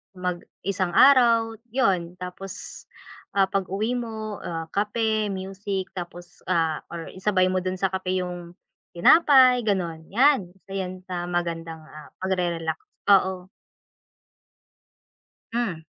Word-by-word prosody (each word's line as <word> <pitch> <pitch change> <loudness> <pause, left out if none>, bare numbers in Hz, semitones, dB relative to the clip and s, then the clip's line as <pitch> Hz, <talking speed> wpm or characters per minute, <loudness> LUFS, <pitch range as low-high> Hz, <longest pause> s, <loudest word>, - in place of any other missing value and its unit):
mag 180 -1 -2 0.2
isang 185 -3 -1
araw, 235 -4 +5
yun. 185 -8 0
Tapos, 180 +1 -8 0.5
ah, 195 - +5
pag-uwi 195 +3 -1
mo, 220 -3 -5
ah, 165 -1 -5
kape, 215 +1 0
music 195 0 -4
tapos, 175 -1 -9
ah, 160 -2 +1
or 170 -1 -7
isabay 185 -1 +1
mo 185 - +1
dun 185 0 -3
sa 190 0 -1
kape 185 0 -1
yung 175 -1 -7 0.4
tinapay, 260 - +6
ganon. 170 -5 -1
'Yan, 255 -4 +3
isa 195 0 -18
'yan 185 -1 -4
sa 175 -1 -4
magandang, 165 -2 -3
ah, 155 -1 -12
pagre-relax, 175 -4 -1 0.3
oo. 190 -2 +3 2.0
Hmm. 230 -8 -1
185 Hz, 115 wpm, -25 LUFS, 175-210 Hz, 2.0 s, tinapay